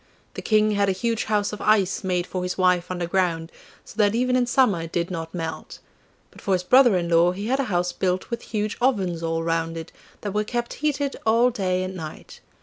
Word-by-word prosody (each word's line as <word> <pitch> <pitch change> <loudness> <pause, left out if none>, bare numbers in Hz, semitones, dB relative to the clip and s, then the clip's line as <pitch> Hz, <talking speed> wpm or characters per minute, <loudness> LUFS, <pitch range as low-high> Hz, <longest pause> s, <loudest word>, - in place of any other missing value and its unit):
The - - -6
King 215 -1 +3
had 200 -1 +2
a - - +2
huge 230 +4 -1
house 210 -1 0
of 210 - -6
ice 205 -3 +2
made 180 -2 0
for 185 - -4
his 180 0 -3
wife 180 -2 +2
underground, 175 -2 -1 0.3
so - - -12
that 210 0 +3
even 250 +1 +1
in 250 -1 +2
summer 245 -9 +3
it 165 0 -7
did 170 +1 -2
not 165 -2 -5
melt. 165 -2 -6 0.5
But - - -15
for 195 - 0
his 180 -1 +1
brother 245 0 +5
in 170 -1 -1
law 170 +1 +4
he 200 +3 -5
had 260 +4 0
a 275 - +1
house 180 -4 0
built 185 +4 -2
with 235 - -3
huge 215 0 -3
ovens 195 -10 +1
all 165 0 -1
round 165 0 -1
it, 165 0 -7 0.3
that 205 - -3
were 210 0 +1
kept 240 +2 -3
heated 285 -2 -1
all 230 +3 +4
day 185 -5 -1
and 185 0 -5
night. 160 -4 -9
190 Hz, 225 wpm, -24 LUFS, 175-220 Hz, 0.5 s, brother